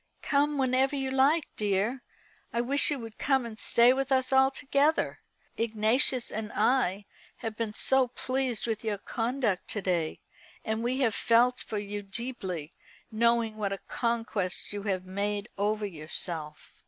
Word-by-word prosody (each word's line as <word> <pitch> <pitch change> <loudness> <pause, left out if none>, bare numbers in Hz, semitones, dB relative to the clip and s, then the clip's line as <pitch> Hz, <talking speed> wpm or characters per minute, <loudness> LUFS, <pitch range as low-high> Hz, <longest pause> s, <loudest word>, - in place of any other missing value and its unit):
"Come 290 +1 +2
whenever 265 +1 +2
you 270 -1 -2
like, 280 +4 +3
dear. 210 +5 0 0.5
I 235 - -1
wish 275 +6 +3
you 295 - 0
would 225 -3 -9
come 265 -3 +2
and 220 -2 -8
stay 240 +2 +5
with 270 +1 -2
us 260 0 +2
altogether. 275 +3 +2 0.4
Ignatius 230 +3 +2
and 215 0 -4
I 205 -6 +1 0.3
have 225 -1 -5
been 220 -2 -3
so 265 -1 +4
pleased 255 -1 -2
with 225 -2 -2
your 215 -2 -1
conduct 230 -2 -2
to 210 - -3
day; 170 -4 -1 0.5
and 220 +1 -1
we 255 +3 0
have 230 -5 +3
felt 240 +4 +3
for 215 - -3
you 205 0 -4
deeply, 195 - -5 0.4
knowing 230 0 +2
what 205 -2 -1
a - - -3
conquest 225 -6 -1
you 205 - -4
have 185 -1 -1
made 200 +2 -2
over 210 +1 0
yourself." 155 -2 -6
230 Hz, 155 wpm, -29 LUFS, 205-260 Hz, 0.5 s, stay